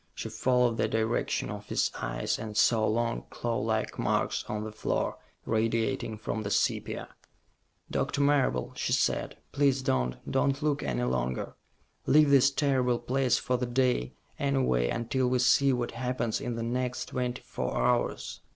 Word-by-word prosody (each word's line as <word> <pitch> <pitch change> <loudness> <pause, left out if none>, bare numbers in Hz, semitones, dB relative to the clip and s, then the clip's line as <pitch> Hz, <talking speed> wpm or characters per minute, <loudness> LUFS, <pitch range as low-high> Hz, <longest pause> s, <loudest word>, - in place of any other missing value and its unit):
She - - -5
followed 125 -2 +2
the - - +1
direction 110 +1 -1
of - - -7
his - - +1
eyes, - - -2
and 110 -1 -5
saw 110 0 +4
long, 115 +1 -1
clawlike 110 -2 -2
marks - - 0
on 105 0 -3
the 110 - -5
floor, 110 - -2 0.3
radiating 115 +1 0
from 110 0 -3
the 100 - -3
sepia. - - -1 0.8
"Doctor - - -1
Marable," 140 - +2
she - - -1
said, - - 0
"please 140 -2 +2
don't 60 - 0
don't 140 +2 +1
look 145 -1 +1
any - - -1
longer. 65 0 -1 0.5
Leave 150 -1 +5
this 135 -1 +6
terrible 135 -4 +1
place 125 +1 +1
for 125 - 0
the 125 0 -2
day, 125 - +1 0.2
anyway, 130 - +1
until 125 - 0
we 125 0 +2
see 135 +2 +4
what 120 -2 -1
happens 125 -1 -2
in 120 -1 -3
the 115 - -3
next 125 +1 -2
twenty 125 -1 -3
four - - -3
hours." 125 -1 0
120 Hz, 155 wpm, -29 LUFS, 110-130 Hz, 0.8 s, this